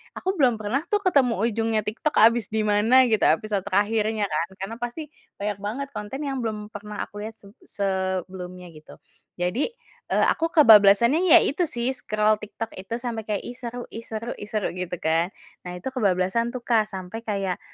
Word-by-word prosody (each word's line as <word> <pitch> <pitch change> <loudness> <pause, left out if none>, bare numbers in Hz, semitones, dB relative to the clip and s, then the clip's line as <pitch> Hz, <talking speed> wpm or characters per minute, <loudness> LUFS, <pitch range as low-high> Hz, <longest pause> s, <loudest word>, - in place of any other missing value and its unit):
aku 375 - -1
belum 250 -4 +4
pernah 215 +5 -1
tuh 415 - +1
ketemu 275 -10 +3
ujungnya 225 -1 +1
TikTok 230 +9 -2
habis 230 0 +5
di 220 0 0
mana 215 +5 +5
gitu 220 - +3
episode 205 +6 +1
terakhirnya 210 +2 +1
kan, 155 +2 0
karena 205 +4 -4
pasti 240 +6 -5 0.3
banyak 205 -1 -2
banget 225 +8 -4
konten 210 +3 -6
yang 270 -2 -2
belum 215 -3 -4
pernah 210 0 -6
aku 205 - -10
lihat 220 +1 -6
seb 200 -2 -15 0.2
sebelumnya 185 -2 -3
gitu. 155 -1 -14 0.4
Jadi, 180 +10 0 0.4
eee, - - +2
aku 330 - 0
kebablasannya 235 - +6
ya 325 - +9
itu 335 +5 0
sih 240 -2 -1
scroll 215 -4 0
TikTok 220 +2 -6
itu 190 +4 -5
sampai 235 -3 -4
kayak 210 -2 -2
"Ih, 245 - -7
seru 245 0 -6
ih, 230 - -7
seru 225 +2 -5
ih, 205 - -7
seru," 215 -1 -2
gitu 180 0 -4
kan. 165 +2 +1 0.4
Nah 180 - -6
itu 180 +8 -7
kebablasan 225 +1 0
tuh, 250 - -5
Kak, 220 -3 +2
sampai 190 +1 -6
kayak 200 -5 -3
215 Hz, 185 wpm, -24 LUFS, 195-240 Hz, 0.4 s, ya